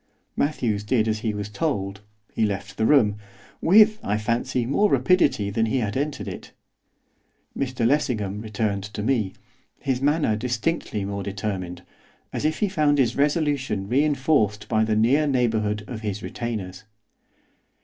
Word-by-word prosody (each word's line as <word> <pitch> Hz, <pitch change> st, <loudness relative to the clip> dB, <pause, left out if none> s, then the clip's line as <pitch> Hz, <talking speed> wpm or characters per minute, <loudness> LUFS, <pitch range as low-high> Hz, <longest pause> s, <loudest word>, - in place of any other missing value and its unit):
Matthews 120 Hz, -8 st, 0 dB
did 110 Hz, 0 st, +1 dB
as 110 Hz, 0 st, 0 dB
he 110 Hz, 0 st, -1 dB
was 105 Hz, -1 st, -4 dB
told, 100 Hz, -6 st, -2 dB, 0.3 s
he -, -, 0 dB
left 100 Hz, -2 st, -2 dB
the 110 Hz, -, +2 dB
room, 110 Hz, -8 st, +4 dB, 0.4 s
with, 215 Hz, +4 st, +6 dB
I 105 Hz, +1 st, 0 dB
fancy, 115 Hz, +3 st, -1 dB
more 205 Hz, -, +2 dB
rapidity 175 Hz, -, +2 dB
than 115 Hz, +2 st, +1 dB
he 110 Hz, -, 0 dB
had 105 Hz, -5 st, -1 dB
entered 145 Hz, +2 st, -2 dB
it. -, -, -8 dB, 1.0 s
Mr 130 Hz, -3 st, -1 dB
Lessingham 110 Hz, -7 st, 0 dB
returned 105 Hz, -2 st, -2 dB
to 105 Hz, 0 st, -6 dB
me, 110 Hz, -6 st, 0 dB, 0.4 s
his 130 Hz, -2 st, -2 dB
manner 145 Hz, -5 st, +2 dB
distinctly 120 Hz, -2 st, -2 dB
more 100 Hz, 0 st, -3 dB
determined, 95 Hz, -3 st, -4 dB, 0.5 s
as -, -, -2 dB
if 155 Hz, +1 st, 0 dB
he 210 Hz, -, +3 dB
found 150 Hz, -6 st, +2 dB
his 130 Hz, -4 st, +2 dB
resolution 145 Hz, -, 0 dB
reinforced 135 Hz, -5 st, +1 dB
by 110 Hz, 0 st, +2 dB
the 110 Hz, -1 st, +1 dB
near 130 Hz, +8 st, +3 dB
neighbourhood 110 Hz, -5 st, 0 dB
of 115 Hz, -4 st, -6 dB
his 105 Hz, -2 st, -4 dB
retainers. 110 Hz, -6 st, -5 dB
115 Hz, 150 wpm, -24 LUFS, 105-140 Hz, 1.0 s, with